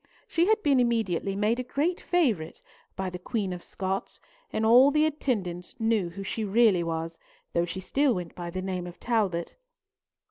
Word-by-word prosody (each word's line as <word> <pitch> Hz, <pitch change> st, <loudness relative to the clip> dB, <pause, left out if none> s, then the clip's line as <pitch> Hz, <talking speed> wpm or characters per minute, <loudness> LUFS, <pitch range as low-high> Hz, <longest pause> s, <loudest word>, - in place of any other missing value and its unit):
She 340 Hz, +1 st, +2 dB
had 435 Hz, 0 st, +3 dB
been 280 Hz, -3 st, +4 dB
immediately 220 Hz, -6 st, 0 dB
made 215 Hz, +4 st, +1 dB
a -, -, -1 dB
great 300 Hz, +8 st, -1 dB
favourite 240 Hz, -, 0 dB, 0.4 s
by 190 Hz, -1 st, -3 dB
the 180 Hz, -, -6 dB
Queen 195 Hz, -1 st, -2 dB
of 180 Hz, -, -8 dB
Scots, 190 Hz, 0 st, -4 dB, 0.3 s
and 220 Hz, -, 0 dB
the 275 Hz, +7 st, +6 dB
attendants 205 Hz, -, -2 dB
all 225 Hz, -, -2 dB
knew 215 Hz, -6 st, +2 dB
who 195 Hz, +4 st, -7 dB
she 220 Hz, +3 st, -3 dB
really 210 Hz, -3 st, +4 dB
was, 165 Hz, 0 st, -3 dB, 0.3 s
though 170 Hz, 0 st, +2 dB
she 185 Hz, +2 st, -5 dB
still 270 Hz, +7 st, +2 dB
went 175 Hz, -2 st, -5 dB
by 175 Hz, -1 st, -6 dB
the 185 Hz, +2 st, -4 dB
name 185 Hz, -2 st, -3 dB
of 175 Hz, -, -11 dB
Talbot. 200 Hz, -8 st, 0 dB
200 Hz, 180 wpm, -27 LUFS, 180-245 Hz, 0.4 s, the